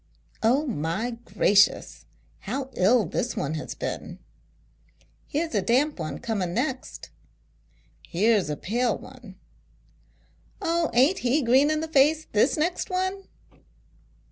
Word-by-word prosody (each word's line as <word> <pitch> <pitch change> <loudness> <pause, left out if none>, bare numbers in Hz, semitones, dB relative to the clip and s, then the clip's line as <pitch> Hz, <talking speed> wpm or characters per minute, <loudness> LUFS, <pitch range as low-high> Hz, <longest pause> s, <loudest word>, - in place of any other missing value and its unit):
" - - -35
Oh, 285 +4 +1
my 195 - -2
gracious! 200 -3 +2 0.3
how 260 +5 -5
ill 215 +4 +3
this - - -3
one 145 - -2
has 155 - -5
been! - - -5 0.4
" - - -37
" - - -35
Here's 315 +1 -2
a 205 - +2
damp 255 +5 +1
one 155 -2 -4
coming 190 -6 -3
next! 260 +1 -4 0.3
" - - -39
" - - -36
Here's 205 -1 +2
a 150 - -3
pale 235 +3 -1
one! 245 -8 -13 0.5
" - - -36 0.2
" - - -35
Oh! 335 -1 0
Aint 275 +10 +4
he 265 +4 +1
green 260 +5 +4
in 310 0 0
the 320 - -3
face, 310 +1 +3
this 215 +9 +2
next 345 +7 -1
one 375 +1 -2
250 Hz, 150 wpm, -25 LUFS, 205-305 Hz, 0.5 s, Aint